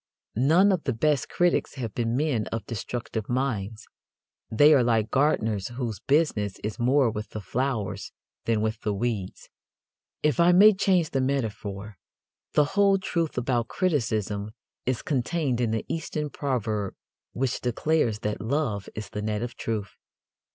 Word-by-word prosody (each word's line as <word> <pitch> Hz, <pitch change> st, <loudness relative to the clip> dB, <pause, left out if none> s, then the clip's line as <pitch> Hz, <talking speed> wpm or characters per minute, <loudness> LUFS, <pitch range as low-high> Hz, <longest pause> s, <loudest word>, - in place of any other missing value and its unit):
None 165 Hz, -, +5 dB
of 180 Hz, -4 st, -1 dB
the 130 Hz, -, +1 dB
best 145 Hz, +3 st, +1 dB
critics 175 Hz, -4 st, +1 dB
have 115 Hz, -6 st, -4 dB
been 115 Hz, 0 st, -1 dB
men 135 Hz, -8 st, 0 dB
of 115 Hz, -2 st, -4 dB
destructive 115 Hz, -1 st, -4 dB
minds. 115 Hz, -5 st, -2 dB, 0.6 s
They 145 Hz, +8 st, +6 dB
are 140 Hz, -, +5 dB
like 115 Hz, -2 st, +1 dB
gardeners 110 Hz, -8 st, +1 dB
whose 120 Hz, -3 st, -4 dB
business 135 Hz, -, +1 dB
is 105 Hz, 0 st, -4 dB
more 125 Hz, 0 st, +3 dB
with 105 Hz, 0 st, -5 dB
the 110 Hz, -, -6 dB
flowers 120 Hz, -1 st, -2 dB, 0.3 s
than 115 Hz, -2 st, +1 dB
with 110 Hz, +1 st, -1 dB
the 105 Hz, -2 st, -1 dB
weeds. 105 Hz, -4 st, -3 dB, 0.8 s
If 150 Hz, +2 st, +2 dB
I 170 Hz, +1 st, +6 dB
may 210 Hz, +4 st, +8 dB
change 190 Hz, -4 st, +2 dB
the 135 Hz, -, +1 dB
metaphor, 110 Hz, -6 st, -3 dB, 0.5 s
the 150 Hz, -, +5 dB
whole 200 Hz, -1 st, +4 dB
truth 170 Hz, -6 st, -2 dB
about 120 Hz, -1 st, 0 dB
criticism 110 Hz, -, -1 dB, 0.4 s
is 130 Hz, -2 st, 0 dB
contained 135 Hz, -1 st, 0 dB
in 120 Hz, -, +1 dB
the 110 Hz, 0 st, -2 dB
Eastern 150 Hz, -2 st, -3 dB
proverb 110 Hz, -8 st, -2 dB, 0.4 s
which 130 Hz, 0 st, -1 dB
declares 125 Hz, -3 st, 0 dB
that 105 Hz, -1 st, -2 dB
"Love 110 Hz, -4 st, -1 dB
is 105 Hz, -1 st, -6 dB
the 105 Hz, -, -4 dB
net 105 Hz, +1 st, -2 dB
of 120 Hz, 0 st, -5 dB
Truth." 105 Hz, -4 st, -4 dB
120 Hz, 150 wpm, -26 LUFS, 110-150 Hz, 0.8 s, may